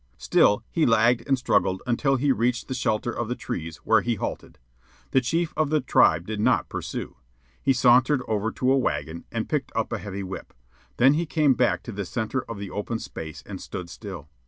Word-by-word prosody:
Still 105 - +3
he 165 - +2
lagged 115 +1 +3
and 135 -1 +3
struggled 100 -6 +1
until 135 +3 +1
he 135 +2 +2
reached 120 -1 0
the 130 - -3
shelter 120 -2 0
of 120 -1 -3
the 125 - -2
trees, 80 -7 -5
where - - +5
he 120 -1 0
halted. - - -5 0.5
The 130 - +4
chief 165 +7 -1
of 155 -2 +1
the 155 0 +2
tribe 85 - +3
did 110 +1 -4
not 105 - +2
pursue. - - -5 0.4
He - - +3
sauntered 130 +2 +4
over 110 +1 0
to 130 0 +1
a 135 - +4
wagon 80 - -2
and - - -2
picked - - -2
up - - -1
a - - -2
heavy 100 -1 -5
whip. 95 0 -8 0.4
Then 130 +3 +6
he 165 +2 -1
came 150 -3 +3
back 125 -1 +1
to 120 - -7
the 100 -1 -4
centre 115 +6 -2
of 115 - -5
the 100 -2 -6
open 105 +3 -3
space 80 -7 -8
and - - -7
stood 90 -2 -7
still. 95 -8 -8
115 Hz, 205 wpm, -25 LUFS, 100-130 Hz, 0.5 s, Then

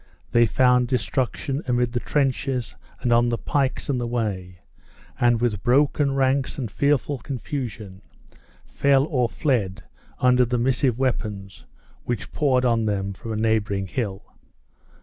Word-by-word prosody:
They 120 0 +4
found 125 +1 +3
destruction 135 +2 -1
amid 125 -1 +1
the 120 - 0
trenches 135 -2 -1 0.3
and 120 - +2
on 120 +1 +4
the 115 - 0
pikes 135 +1 -1
in 135 -3 0
the 120 - -2
way, 95 -7 -3 0.6
and 120 -1 +3
with 110 -5 0
broken 140 +3 +2
ranks 135 0 +1
and 120 -7 -4
fearful 140 +1 +1
confusion, 115 -6 -6 0.6
fell 140 -1 +2
or 125 -6 0
fled 110 - -1 0.3
under 125 -1 +4
the 125 0 0
missive 125 0 +1
weapons 105 -7 -3 0.4
which 120 -4 -4
poured 130 -4 +2
on 115 -2 +2
them 100 -1 -1
from 115 +4 -8
a - - -2
neighboring 110 -3 0
hill. 100 -1 -4
120 Hz, 140 wpm, -23 LUFS, 110-135 Hz, 0.6 s, They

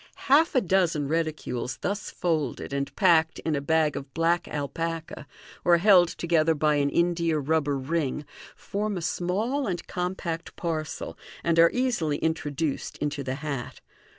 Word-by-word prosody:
Half 315 +4 +5
a 255 - +5
dozen 170 -6 +1
reticules 155 -6 -2
thus 205 +2 -2
folded, 155 -6 -2
and 140 0 -1
packed 160 -1 +4
in 160 -2 -1
a 140 - -1
bag 155 0 +2
of 140 - -6
black 165 +1 +1
alpaca, 160 +1 -4 0.4
or 175 -1 +5
held 180 -1 +6
together 165 -1 +1
by 150 0 +2
an 140 0 +2
india 170 -1 +1
rubber 145 -1 +1
ring, 150 +1 -2 0.3
form 205 0 -3
a - - -4
small 215 - -1
and 175 -3 -3
compact 180 -2 -4
parcel, 160 -3 -4 0.2
and 165 -1 +2
are 170 0 +8
easily 235 - 0
introduced 155 -2 -2
into 145 -1 -2
the 130 0 -3
hat. 140 -5 -4
165 Hz, 150 wpm, -26 LUFS, 150-175 Hz, 0.4 s, are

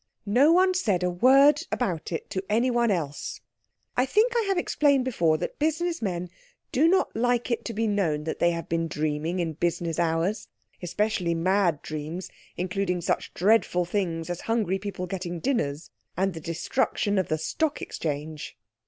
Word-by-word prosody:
No 250 +10 +5
one 370 +2 +5
said 205 - +1
a 180 - +1
word 275 - +5
about 180 -11 -2
it 165 - -4
to 190 - -2
anyone 235 +2 +2
else. 155 -7 -2 0.6
I 250 +2 +2
think 445 - +3
I 465 -2 +2
have 390 -1 +1
explained 285 -6 +2
before 170 -11 +2
that - - -5
business 330 +3 0
men 180 -4 -3 0.4
do 295 +6 +4
not 375 +3 +2
like 245 +1 +1
it 235 - -1
to 230 - -4
be 225 +1 0
known 185 -8 0
that 160 - -4
they 170 - +4
have 170 -2 -3
been 165 0 0
dreaming 155 +3 -2
in 170 -3 -1
business 170 +1 -1
hours. 170 +5 0 0.3
Especially 185 -1 0
mad 175 -2 +1
dreams 155 +4 -5 0.3
including 180 0 -1
such 170 - -1
dreadful 185 -2 +3
things 175 -3 -2
as 175 - -4
hungry 215 -5 0
people 190 -2 -5
getting 175 -2 -4
dinners, 160 - -1 0.3
and 190 +1 +1
the 165 - -7
destruction 200 - 0
of 185 - -1
the 155 - 0
Stock 295 - -1
Exchange. 150 -2 -5
185 Hz, 170 wpm, -26 LUFS, 165-240 Hz, 0.6 s, No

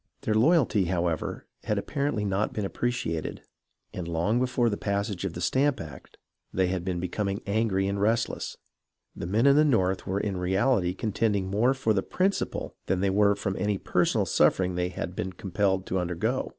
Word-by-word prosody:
Their 110 - 0
loyalty, 115 - +3
however, 85 -2 -2 0.2
had 105 - 0
apparently 140 0 -1
not 100 +1 0
been 105 - -2
appreciated, 100 -8 -2 0.5
and 90 -2 -5
long 85 +8 +1
before 125 -1 +1
the 105 - +1
passage 100 -2 -2
of 95 - -3
the 85 - -6
Stamp 135 +8 +2
Act 75 -5 -10 0.3
they 95 -1 +1
had 90 -2 -2
been 90 -1 -2
becoming 100 +3 -2
angry 100 -2 +1
and 100 0 -2
rest 115 +2 +2
less. - - -6 0.6
The - - -5
men 110 +7 +2
in 140 0 +6
the 150 - +6
North 95 -10 +1
were 95 +2 0
in 100 -2 -2
reality 95 +1 +1
contend 110 +1 0
ing 95 -1 -2
more 120 +7 +3
for 115 -5 +1
the 95 - +1
principle 190 - -1
than 95 -1 +1
they 100 -1 +2
were 100 +1 +4
from 100 -1 -3
any 105 -1 0
per - - +1
sonal - - +1
suffering 90 -1 +3
they 90 0 -1
had 90 0 -5
been 95 +1 -3
compelled 95 +1 0
to 95 - -1
undergo. 90 -1 -1
100 Hz, 190 wpm, -27 LUFS, 90-110 Hz, 0.6 s, in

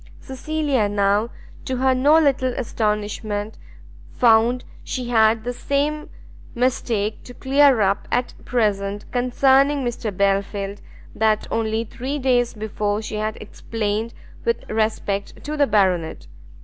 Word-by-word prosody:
Cecilia 270 -4 -1
now, 205 +2 +1 0.4
to 260 - -2
her 260 +1 +3
no 285 +5 +4
little 270 -5 +2
astonishment, 210 -2 -2 0.5
found 235 +1 +3 0.2
she 250 -2 -4
had 220 -1 +3
the 245 +1 -3
same 290 +4 -1 0.5
mistake 230 -4 -1
to 245 - -12
clear 275 -3 +4
up 195 0 +1
at 245 0 0
present 205 -4 -1
concerning 270 +3 +3
Mr 235 -2 -3
Belfield, 200 +1 -1 0.3
that 215 -1 +1
only 225 0 0
three 260 +5 -5
days 245 -3 +1
before 210 0 -2
she 215 - -5
had 215 +1 -2
explained 215 +1 -4 0.3
with 465 0 -1
respect 215 -2 -2
to 300 +1 -4
the 290 -2 +3
Baronet. 185 -6 +1
225 Hz, 125 wpm, -22 LUFS, 210-260 Hz, 0.5 s, no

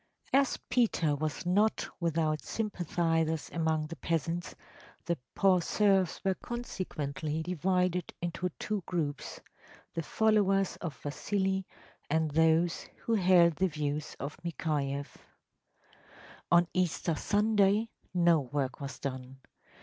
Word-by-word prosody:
‚ÄĚ 270 - +7
As 275 - +1
Peter 190 - +2
was 155 +3 -3
not 205 +5 +2
without 160 -2 0
sympathizers 165 -6 -1
among 160 -2 +1
the 165 +2 -7
peasants, 165 +2 -2 0.5
the 170 - +1 0.2
poor 190 -2 +4
serfs 195 0 +2
were 190 - +3
consequently 160 - -4
divided 180 +1 0
into 175 +1 -2
two 210 -2 -2
groups: 150 -6 -3 0.5
the 165 - -2
followers 195 +1 +2
of 155 -8 -5
Vasili 190 +5 -1 0.4
and 160 0 +1
those 160 +2 +3 0.2
who 230 - 0
held 180 -5 +5
the 190 - +3
views 150 -2 -3
of 140 +2 -5
Mikhayeff. 145 -4 -2 1.3
On 175 0 +6
Easter 175 -2 0
Sunday 205 +4 +2 0.2
no 175 -2 +4
work 135 0 -3
was 140 0 -5
done. 130 -1 -6
170 Hz, 115 wpm, -31 LUFS, 155-190 Hz, 1.3 s, ÄĚ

